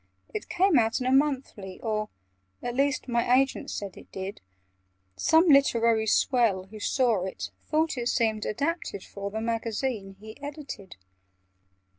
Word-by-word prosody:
"It 430 - -5
came 365 -6 +4
out 225 +2 +1
in 250 - -3
a 255 - +2
'Monthly,' 265 -9 0
or 215 -1 -2 0.5
At 245 - -2
least 275 0 +1
my 240 +1 +3
agent 270 0 -1
said 200 -2 -5
it - - -14
did: 190 +1 -6 0.7
Some 320 - +4
literary 230 -6 +4
swell, 220 -5 +3
who 210 +3 -11
saw 230 -4 +2
It, 190 - -5 0.2
thought 310 -3 +1
it 240 - -1
seemed 220 -3 +1
adapted 285 - -2
for 200 0 -6
The 220 +2 -4
Magazine 225 -2 -2
he 220 +5 -11
edited. 285 - -7
235 Hz, 145 wpm, -27 LUFS, 210-275 Hz, 0.7 s, came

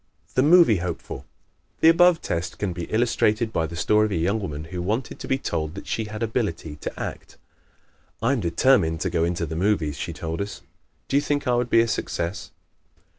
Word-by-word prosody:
The 130 - +3
Movie 155 - +6
Hopeful 85 -1 -5 0.5
¶ - - -39
The 160 - +8
above 170 0 +5
test 85 0 -3
can 100 -3 -2
best 85 -1 -5
be - - -17
illustrated 110 -1 +1
by 80 -1 0
the 85 - -8
story 105 +5 +3
of - - -7
a - - 0
young 95 +7 +1
woman 75 -7 -5
who 90 - -3
wanted 110 +8 -2
to - - -7
be 135 - +1
told 80 - -3
that 100 - -8
she 110 - -2
had 110 +1 -5
ability 105 -9 -2
to - - -6
act. - - -6 0.8
"I 115 +4 +1
am 135 - 0
determined 85 -2 +2
to 95 - -1
go 85 -2 +1
into 85 0 -1
the 80 +1 -5
movies," 85 -5 0
she - - -4
told 80 +2 -4
us. 100 0 -6 0.4
"Do 135 - +2
you - - +4
think 145 0 -1
I 125 - +3
would 120 0 +1
be 115 - +5
a 115 - +1
success?" 85 -4 -3
100 Hz, 220 wpm, -24 LUFS, 85-120 Hz, 0.8 s, The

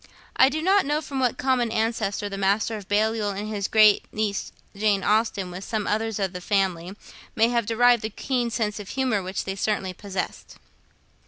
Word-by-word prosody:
I 265 - +6
do 310 +3 -3
not 390 +2 +4
know 295 +2 0
from 280 -3 -5
what 250 -2 +1
common 250 -3 +1
ancestor 220 -2 -1
the 200 - -5
Master 200 +3 +1
of 205 -3 -8
Balliol 215 +1 +1
and 210 +1 -4
his 205 -2 -2
great 215 -2 +4
niece 210 -2 -2 0.2
Jane 200 -1 +1
Austen, 210 -4 +1
with 180 +2 -7
some 215 -1 -3
others 220 0 -1
of 195 -3 -2
the 180 - -6
family, 190 -2 -1 0.4
may 225 +1 +4
have 235 -3 0
derived 240 0 +4
the 220 - -3
keen 245 +2 -2
sense 215 -2 -2
of 205 - -8
humour 255 -6 0
which 185 +1 -4
they 195 - -4
certainly 195 -2 -1
possessed. 190 0 -6
215 Hz, 190 wpm, -24 LUFS, 200-235 Hz, 0.4 s, I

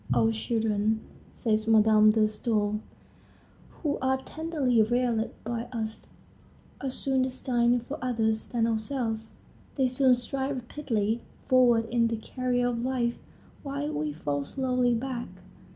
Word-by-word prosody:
"Our 225 - +4
children," 220 -1 0 0.4
says 220 -1 0
Madame 215 -1 +6
de 215 0 +4
Stael, 210 -1 0 0.9
"who 295 -3 -3
are 265 0 +2
tenderly 280 -5 0
reared 235 0 +1
by 235 +1 -3
us, 220 -2 -5 0.8
are 270 - 0
soon 265 0 0
destined 245 -2 +1
for 290 - -6
others 225 -3 0
than 235 -2 0
ourselves. 225 -1 -2 0.4
They 265 -3 +2
soon 255 0 +4
stride 265 +3 -3
rapidly 235 -4 -2 0.3
forward 240 -3 +4
in 235 -1 +3
the 230 0 -2
career 245 +2 -1
of 235 -1 -2
life, 245 -2 0 0.4
while 285 +1 -3
we 150 0 -1
fall 145 -1 -2
slowly 250 - +1
back. 245 0 -3
235 Hz, 130 wpm, -28 LUFS, 220-255 Hz, 0.9 s, Madame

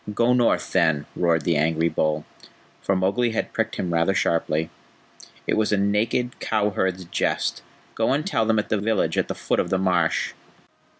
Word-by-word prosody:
"Go 120 +3 +2
north, 120 -2 +1
then," 75 -3 +2
roared 85 -3 +1
the 85 +2 +1
angry 80 +2 +2
bull, 75 -1 -1 0.6
for 95 - 0
Mowgli 100 +6 +1
had - - -2
pricked 110 0 -1
him 90 -2 -2
rather 85 +4 +2
sharply. 80 -3 0 0.7
"It - - 0
was 110 -1 +1
a 105 - +3
naked 105 +5 0
cow 105 -1 0
herd's 95 -1 -1
jest. 85 - -1 0.3
Go 115 - 0
and 145 +4 0
tell 110 - 0
them 110 -1 +2
at 105 - -1
the 105 - +1
village 110 +1 0
at - - 0
the - - -4
foot - - -1
of - - 0
the 95 - +1
marsh." 90 -3 +1
95 Hz, 185 wpm, -23 LUFS, 85-110 Hz, 0.7 s, a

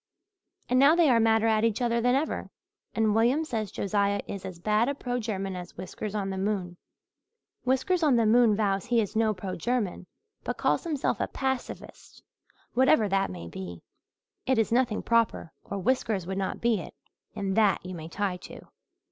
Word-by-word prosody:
And 255 - +3
now 285 +4 +6
they 335 -5 +4
are 235 - +4
madder 225 0 +3
at 220 -1 +2
each 230 -2 +1
other 235 -1 +1
than 245 +2 +3
ever 295 +4 -2 0.5
and 220 -2 +2
William 245 +8 +2
says 220 -8 -3
Josiah 200 0 0
is 195 -1 -6
as 185 -2 -7
bad 215 +7 +1
a 280 - -2
pro 245 -2 -3
German 195 -4 -3
as 180 -1 -9
Whiskers 200 +3 -6
on 195 -2 -2
the 190 - -4
Moon. 190 -3 -2 0.9
Whiskers 265 +8 +1
on 295 -5 +4
the 230 -1 +3
moon 225 -1 +5
vows 200 -1 0
he 240 -1 +2
is 215 -1 -2
no 220 -1 +3
pro 185 0 -5
German 200 -2 -2 0.4
but - - -3
calls - - +1
himself 300 -5 -1
a - - 0
pacifist, 265 -1 -5 0.5
whatever 260 -3 +4
that 195 0 +1
may 85 -2 -7
be. 85 -1 -8 0.6
It 260 -1 +3
is 225 -1 +1
nothing 240 -2 +1
proper 230 -7 +1
or 200 - -5
Whiskers 210 -3 0
would 190 +2 -3
not 190 - -3
be 230 -3 +2
it - - -9 0.4
and 195 -2 -2
that 210 -4 +3
you 185 - -6
may 160 -2 -7
tie 195 0 -2
to. - - -12
215 Hz, 190 wpm, -27 LUFS, 195-245 Hz, 0.9 s, now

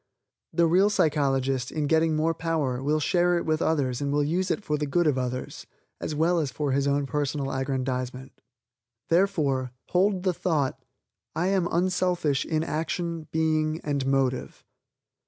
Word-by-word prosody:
The 170 - +3
real 185 +5 +4
psychologist, 135 -8 +1
in 155 -2 -1
getting 160 +1 +2
more 160 +2 +1
power, 155 -6 -1
will 150 +3 +1
share 175 +2 +2
it 170 - -2
with 155 0 0
others 135 -6 0
and 140 0 -1
will 145 0 +2
use 180 +6 0
it - - -1
for 150 - -1
the 150 0 -2
good 175 +5 +1
of 150 -3 +3
others, 125 0 -4 0.3
as 155 - -4
well 170 +3 +2
as 150 -4 -1
for 145 +1 -2
his 140 +1 +1
own 140 0 +1
personal 145 -1 -2
aggrandizement. 130 -1 -3 0.8
Therefore 150 -9 +1 0.2
hold 185 0 +2
the 185 -2 +2
thought: 155 -6 -1 0.5
"I 175 +3 +1
am 190 -3 +1
unselfish 175 -5 +1
in 160 -1 0
action, 165 +1 -3
being 155 0 +1
and 140 -2 -1
motive." 135 -2 0
155 Hz, 160 wpm, -26 LUFS, 135-170 Hz, 0.8 s, real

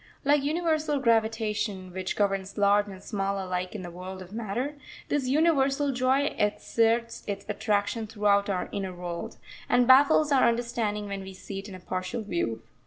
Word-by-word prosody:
Like 290 0 +4
universal 310 -1 0
gravitation, 220 -5 0
which 185 0 -3
governs 195 -1 -1
large 205 0 +4
and 195 -1 -10
small 195 -2 -2
alike 185 0 -3
in 195 - -5
the 175 - -7
world 185 +2 -7
of 180 - -15
matter, 235 +6 -3 0.3
this 285 -3 0
universal 280 -1 +2
joy 260 +3 +1
exerts 230 +2 +1
its 200 -1 -4
attraction 215 +1 -1
throughout 205 -1 +2
our 185 -2 -1
inner 190 -2 -4
world, 175 -1 -6 0.3
and 245 0 +4
baffles 285 +4 +6
our 270 -2 +5
understanding 230 -3 -1
when 200 -1 -4
we 190 0 -9
see 195 +1 -7
it 200 +2 -9
in 190 - -8
a - - -9
partial 185 +5 -4
view. 115 - -2
210 Hz, 170 wpm, -27 LUFS, 190-255 Hz, 0.3 s, baffles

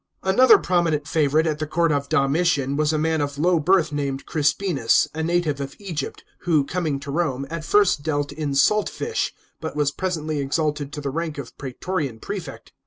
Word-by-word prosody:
Another 230 +6 +6
prominent 165 -5 0
favourite 155 +1 +2
at 155 -1 -1
the 155 - -2
court 165 +1 +1
of 140 -1 -1
Domitian 140 -1 +1
was 150 +1 +1
a 155 - 0
man 160 0 +1
of 145 0 -3
low 170 +2 +3
birth 170 0 +3
named 140 -2 -3
Crispinus, 150 -4 +2
a 160 - -3
native 160 -4 0
of 140 0 -6
Egypt, 170 -9 -5 0.2
who, 155 -5 +2
coming 155 -4 -2
to 140 -1 -6
Rome, 140 -4 -1
at 165 -1 -4
first 185 -3 +3
dealt 145 -1 -1
in 145 -1 -3
salt 210 +10 +3
fish, 455 0 -2 0.3
but 160 -2 -5
was 145 -1 +1
presently 155 -4 -2
exalted 145 0 -1
to 150 - -5
the 140 -1 -3
rank 160 0 -3
of 135 -4 -8
praetorian 140 -1 -4
prefect. 180 - -7
155 Hz, 185 wpm, -23 LUFS, 140-170 Hz, 0.3 s, Another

